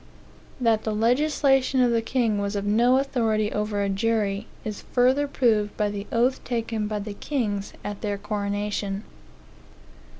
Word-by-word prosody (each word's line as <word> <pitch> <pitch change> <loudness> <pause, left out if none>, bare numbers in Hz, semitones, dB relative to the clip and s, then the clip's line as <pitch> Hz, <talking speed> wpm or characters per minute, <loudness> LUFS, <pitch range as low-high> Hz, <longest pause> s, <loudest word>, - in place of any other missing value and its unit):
That 230 -3 +2
the 215 -1 -1
legislation 270 +2 +2
of 245 -1 +4
the 230 -1 +2
king 225 -3 0
was 200 +1 -2
of 200 0 -2
no 235 +5 +4
authority 225 -6 +1
over 210 -1 -1
a - - 0
jury, 205 0 0 0.2
is 215 -2 -4
further 260 +3 +3
proved 220 -7 +1
by 210 -1 +1
the 205 0 -5
oath 245 +3 +1
taken 225 -3 -2
by 210 0 -2
the 205 0 -5
kings 205 -5 -2
at 205 -1 -5
their 205 -2 -2
coronation. 205 0 -2
215 Hz, 155 wpm, -25 LUFS, 205-245 Hz, 0.2 s, of